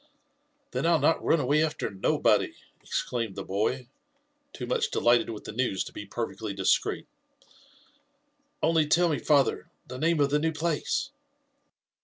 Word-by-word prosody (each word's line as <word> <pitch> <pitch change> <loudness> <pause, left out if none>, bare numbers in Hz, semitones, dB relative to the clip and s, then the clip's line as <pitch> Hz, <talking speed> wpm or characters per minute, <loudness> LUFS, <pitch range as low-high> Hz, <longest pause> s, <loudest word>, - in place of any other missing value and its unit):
Then - - -1
I'll 170 -1 +5
not 165 - +2
run 165 - +3
away 145 +3 +2
after 160 - -2
nobody! 95 -1 +1 0.3
exclaimed 115 -5 -3
the - - -5
boy, 110 +6 -1 0.6
too - - -6
much 465 -2 0
delighted 120 - +3
with 110 -2 -7
the - - -7
news 110 -4 -1
to - - -11
be 105 - -8
perfectly 110 -1 -4
discreet; 95 -1 +1 0.8
*' 290 0 -32
only 160 -2 +3
tell 170 +3 +3
me, 150 - 0
father, 145 -3 +2 0.2
the 130 - -8
name 165 +1 +2
of 140 -1 +2
the 150 - +3
new 160 +1 0
place?" 160 - -1
150 Hz, 155 wpm, -27 LUFS, 120-170 Hz, 0.8 s, I'll